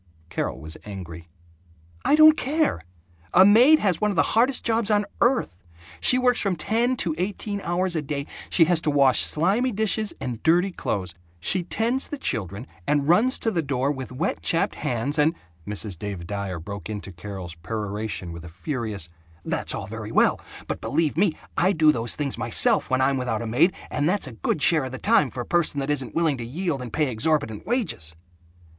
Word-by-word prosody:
Carol -, -, -3 dB
was 80 Hz, +1 st, -6 dB
angry. 85 Hz, -5 st, -8 dB, 0.8 s
"I -, -, +4 dB
don't 310 Hz, 0 st, +8 dB
care! 300 Hz, -, 0 dB, 0.5 s
A 190 Hz, +2 st, +8 dB
maid 245 Hz, +10 st, +7 dB
has 190 Hz, -, 0 dB
one 210 Hz, -, +2 dB
of 200 Hz, -, -2 dB
the -, -, +4 dB
hardest 245 Hz, +4 st, +3 dB
jobs 225 Hz, -2 st, +1 dB
on 210 Hz, -1 st, +2 dB, 0.2 s
earth. 240 Hz, -, +1 dB, 0.4 s
She 250 Hz, -, +5 dB
works 250 Hz, -1 st, +2 dB
from 195 Hz, -3 st, 0 dB
ten 230 Hz, +9 st, 0 dB
to 170 Hz, -7 st, 0 dB
eighteen 200 Hz, +2 st, -3 dB
hours 180 Hz, 0 st, -1 dB
a 160 Hz, -, 0 dB
day. 140 Hz, -1 st, -4 dB, 0.2 s
She 165 Hz, -, +5 dB
has 165 Hz, -1 st, +2 dB
to 155 Hz, -, 0 dB
wash 140 Hz, -3 st, +4 dB
slimy 200 Hz, +11 st, +2 dB
dishes 215 Hz, 0 st, 0 dB
and 120 Hz, -3 st, -5 dB
dirty 175 Hz, +4 st, +3 dB
clothes. 95 Hz, -, -3 dB, 0.3 s
She 185 Hz, -, +2 dB
tends 230 Hz, +9 st, 0 dB
the 295 Hz, -, -5 dB
children 105 Hz, -, -3 dB, 0.2 s
and 145 Hz, -1 st, +1 dB
runs 220 Hz, -, +4 dB
to 225 Hz, -, -1 dB
the 175 Hz, -5 st, 0 dB
door 140 Hz, -1 st, -1 dB
with 130 Hz, -3 st, -6 dB
wet 150 Hz, +9 st, -2 dB
chapped 165 Hz, -, 0 dB
hands 130 Hz, +6 st, -2 dB
and 155 Hz, +3 st, +3 dB, 0.2 s
" 80 Hz, +2 st, -30 dB
Mrs. 105 Hz, -4 st, -2 dB
Dave 100 Hz, -4 st, -5 dB
Dyer 100 Hz, -2 st, -4 dB
broke 100 Hz, +3 st, -7 dB
into 100 Hz, -2 st, -6 dB
Carol's 90 Hz, -1 st, -7 dB
peroration 105 Hz, +1 st, -4 dB
with 85 Hz, 0 st, -9 dB
a 85 Hz, -, -9 dB
furious, 105 Hz, -, -4 dB, 0.4 s
"That's -, -, -2 dB
all -, -, -5 dB
very -, -, -7 dB
well, -, -, +3 dB, 0.3 s
but -, -, -4 dB
believe 160 Hz, -3 st, 0 dB
me, 180 Hz, 0 st, +2 dB, 0.2 s
I 185 Hz, +3 st, +3 dB
do 155 Hz, -2 st, +5 dB
those 115 Hz, -3 st, -1 dB
things 140 Hz, -3 st, -2 dB
myself 190 Hz, -, +3 dB
when 130 Hz, 0 st, +1 dB
I'm 135 Hz, +1 st, +2 dB
without 120 Hz, -3 st, -2 dB
a -, -, -5 dB
maid 135 Hz, +11 st, +3 dB, 0.2 s
and 145 Hz, +2 st, +1 dB
that's 200 Hz, -1 st, 0 dB
a 130 Hz, -, -8 dB
good 140 Hz, +6 st, -1 dB
share 155 Hz, -4 st, +4 dB
of 130 Hz, -, -7 dB
the -, -, -4 dB
time 200 Hz, -, +3 dB
for 125 Hz, -, -5 dB
a -, -, -6 dB
person 170 Hz, -3 st, +1 dB
that 140 Hz, +1 st, -1 dB
isn't 135 Hz, -4 st, -3 dB
willing 160 Hz, -5 st, +1 dB
to -, -, -4 dB
yield 150 Hz, +3 st, -3 dB
and 125 Hz, -2 st, -7 dB
pay 150 Hz, +2 st, 0 dB
exorbitant 115 Hz, -2 st, -1 dB
wages!" 200 Hz, -, -2 dB
145 Hz, 200 wpm, -24 LUFS, -, 0.8 s, don't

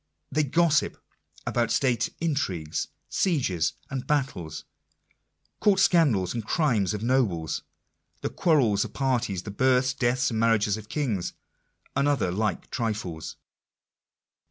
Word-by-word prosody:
— -, -, -50 dB
they 155 Hz, -, +4 dB
gossip 150 Hz, +1 st, +2 dB, 0.5 s
about 120 Hz, -1 st, +1 dB
state 120 Hz, -4 st, +1 dB
intrigues, 95 Hz, -, -1 dB, 0.2 s
sieges 125 Hz, -, +1 dB, 0.2 s
and 135 Hz, -2 st, -4 dB
battles, 130 Hz, -, -1 dB, 1.0 s
court 200 Hz, -2 st, +4 dB
scandal, 155 Hz, -, +4 dB
the 115 Hz, +6 st, -3 dB
crimes 110 Hz, -, +1 dB
of 105 Hz, -, -5 dB
nobles, 110 Hz, -, +1 dB, 0.6 s
the -, -, -1 dB
quarrels 125 Hz, -, +3 dB
of -, -, -8 dB
parties, 120 Hz, -9 st, 0 dB
the 105 Hz, -, -6 dB
births, 130 Hz, +3 st, +3 dB
deaths, 125 Hz, 0 st, +1 dB
and 110 Hz, -, -1 dB
marriages 110 Hz, -3 st, +3 dB
of 110 Hz, -1 st, -9 dB
kings, 115 Hz, -, -1 dB, 0.6 s
and 140 Hz, -, +2 dB
other 135 Hz, -11 st, +1 dB
like 105 Hz, 0 st, -2 dB
trifles. 100 Hz, -9 st, -3 dB
120 Hz, 125 wpm, -26 LUFS, 100-140 Hz, 1.0 s, they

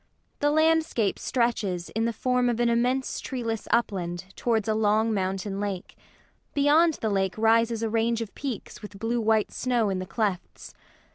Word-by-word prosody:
The 290 Hz, -, +2 dB
landscape 315 Hz, -8 st, +2 dB
stretches, 210 Hz, -8 st, -1 dB
in 225 Hz, +1 st, -1 dB
the 235 Hz, -, +1 dB
form 250 Hz, +2 st, +1 dB
of 235 Hz, -1 st, -1 dB
an 240 Hz, 0 st, +3 dB
immense 250 Hz, +3 st, 0 dB
treeless 230 Hz, -4 st, -4 dB
upland, 185 Hz, -5 st, -1 dB
towards 225 Hz, -3 st, 0 dB
a 220 Hz, -, +2 dB
long 220 Hz, +1 st, +2 dB
mountain 195 Hz, 0 st, -2 dB
lake. 200 Hz, -3 st, -4 dB, 0.6 s
Beyond 300 Hz, +3 st, +4 dB
the 220 Hz, -, -2 dB
lake 190 Hz, -1 st, 0 dB
rises 230 Hz, +1 st, +3 dB
a -, -, +1 dB
range 230 Hz, +1 st, +1 dB
of 225 Hz, -3 st, -5 dB
peaks 260 Hz, -8 st, -6 dB
with 210 Hz, -2 st, -10 dB
blue 230 Hz, +3 st, -1 dB
white 220 Hz, -1 st, +2 dB
snow 240 Hz, -5 st, 0 dB
in 185 Hz, -, -2 dB
the 185 Hz, -, -5 dB
clefts. 200 Hz, -4 st, -3 dB
225 Hz, 165 wpm, -26 LUFS, 200-240 Hz, 0.6 s, Beyond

